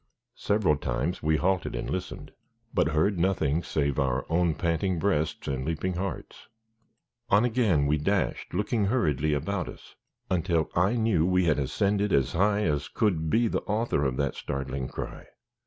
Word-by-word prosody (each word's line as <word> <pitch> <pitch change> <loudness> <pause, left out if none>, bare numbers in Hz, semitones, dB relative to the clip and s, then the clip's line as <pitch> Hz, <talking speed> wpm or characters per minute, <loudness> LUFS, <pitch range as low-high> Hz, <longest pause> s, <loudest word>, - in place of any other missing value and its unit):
Several 100 -8 +2
times 70 +5 -2
we 80 0 +2
halted 95 -4 0
and - - -3
listened, 90 -1 -5 0.4
but - - +2
heard 80 +5 +1
nothing 85 -4 +1
save 70 -3 -1
our 65 -1 0
own 85 -1 +2
panting 85 +2 0
breasts 80 -4 -1
and 65 -1 -2
leaping 80 +5 -2
hearts. 90 +1 -5 0.8
On 105 +4 +4
again 110 - +2
we 75 +1 +1
dashed, 95 +6 -1
looking 105 +3 0
hurriedly 75 - +1
about 100 +6 -2
us, - - -12 0.3
until 85 -3 0
I 90 +6 +3
knew 110 -8 +2
we 90 -1 +2
had 75 -3 +2
ascended 100 +8 0
as 65 -6 +2
high 100 +4 +2
as 75 -5 0
could 80 -7 0
be 115 +7 +3
the - - -1
author 105 -7 0
of 65 -2 -1
that 70 -1 0
startling 70 -2 -4
cry. - - -7
85 Hz, 160 wpm, -27 LUFS, 75-100 Hz, 0.8 s, On